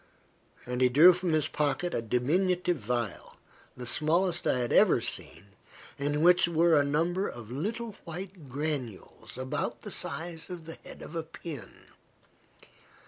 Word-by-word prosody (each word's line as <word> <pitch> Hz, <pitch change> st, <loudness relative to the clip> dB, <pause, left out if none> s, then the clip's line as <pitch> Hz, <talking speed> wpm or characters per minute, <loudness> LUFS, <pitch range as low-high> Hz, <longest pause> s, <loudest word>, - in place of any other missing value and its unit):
And 125 Hz, +1 st, -3 dB
he 125 Hz, -, +6 dB
drew 160 Hz, +8 st, +8 dB
from 180 Hz, -1 st, -1 dB
his 155 Hz, -2 st, +2 dB
pocket 150 Hz, +4 st, -1 dB
a -, -, 0 dB
diminutive 175 Hz, -, +1 dB
vial, 115 Hz, -2 st, -3 dB, 0.4 s
the 125 Hz, -, -6 dB
smallest 170 Hz, +7 st, +1 dB
I -, -, +3 dB
had 120 Hz, -1 st, -1 dB
ever -, -, +6 dB
seen, 95 Hz, +5 st, -4 dB, 0.5 s
in 145 Hz, +2 st, 0 dB
which 180 Hz, 0 st, +6 dB
were 170 Hz, 0 st, +4 dB
a 145 Hz, -, +5 dB
number 170 Hz, +7 st, 0 dB
of 120 Hz, -2 st, -8 dB
little 220 Hz, -, -3 dB
white 175 Hz, -2 st, -8 dB
granules, 135 Hz, -9 st, -5 dB
about 130 Hz, 0 st, -3 dB
the -, -, -7 dB
size 165 Hz, 0 st, -4 dB
of 175 Hz, -3 st, -7 dB
the 165 Hz, -, -9 dB
head -, -, -10 dB
of 170 Hz, -, -9 dB
a 165 Hz, -, 0 dB
pin. 160 Hz, -3 st, -9 dB
155 Hz, 150 wpm, -29 LUFS, 130-175 Hz, 0.5 s, drew